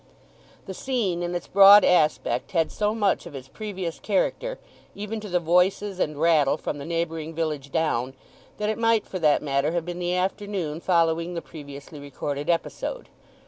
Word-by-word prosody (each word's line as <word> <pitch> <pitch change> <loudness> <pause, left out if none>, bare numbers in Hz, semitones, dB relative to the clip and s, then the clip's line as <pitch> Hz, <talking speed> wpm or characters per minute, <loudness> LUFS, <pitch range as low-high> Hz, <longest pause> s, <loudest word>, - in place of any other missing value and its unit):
The 190 - -6
scene 205 -7 -1
in 175 0 -3
its 175 - -3
broad 200 +1 +8
aspect 155 -7 +1
had 165 -2 +1
so 210 +1 -1
much 205 -3 0
of - - -11
its 135 -1 -8
previous 190 -3 -6
character, - - -1 0.4
even 210 +2 -5
to 210 -1 -8
the 180 0 +1
voices 180 +3 +1
and 150 -4 -1
rattle 155 -3 +3
from 145 - -5
the 140 - -7
neighbouring 165 -1 -3
village 150 -4 -3
down, 130 -5 -1 0.4
that 210 - -2
it 220 +1 -2
might 230 -1 +2
for 185 - -5
that 150 -3 +3
matter 140 +2 0
have 170 -2 -1
been 175 0 -5
the 175 0 -1
afternoon 185 -4 -2
following 170 -1 +1
the 170 - -3
previously 145 -1 -10
recorded 145 +1 -5
episode. 325 - -2
170 Hz, 175 wpm, -25 LUFS, 155-195 Hz, 0.4 s, broad